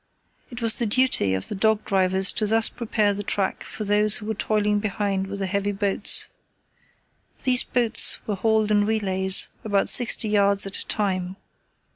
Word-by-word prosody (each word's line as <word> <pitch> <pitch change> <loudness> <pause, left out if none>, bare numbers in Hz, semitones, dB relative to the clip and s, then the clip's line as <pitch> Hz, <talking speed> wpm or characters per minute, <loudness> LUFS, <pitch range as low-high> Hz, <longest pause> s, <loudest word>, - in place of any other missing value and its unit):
It 240 -1 -8
was 225 -1 +3
the 235 - -2
duty 210 - +2
of 95 - -6
the - - -5
dog 215 +1 0
drivers 190 -1 +1
to 215 - -2
thus 225 +1 +2
prepare 215 -3 -1
the 200 - -5
track 200 -1 -3
for 215 - -8
those 210 +1 +2
who 210 - -7
were 220 - -3
toiling 210 0 -1
behind 200 -2 -3
with 200 +1 -7
the 195 - -3
heavy 200 +1 -2
boats. 200 0 +2 1.2
These 255 -1 +3
boats 235 -3 +2
were 210 - -3
hauled 220 +1 0
in 205 0 +1
relays, 190 -3 +2
about 200 -2 -1
sixty 240 -2 +4
yards 200 -1 +1
at 195 - -7
a - - -8
time. 185 -3 -2
205 Hz, 175 wpm, -22 LUFS, 195-220 Hz, 1.2 s, sixty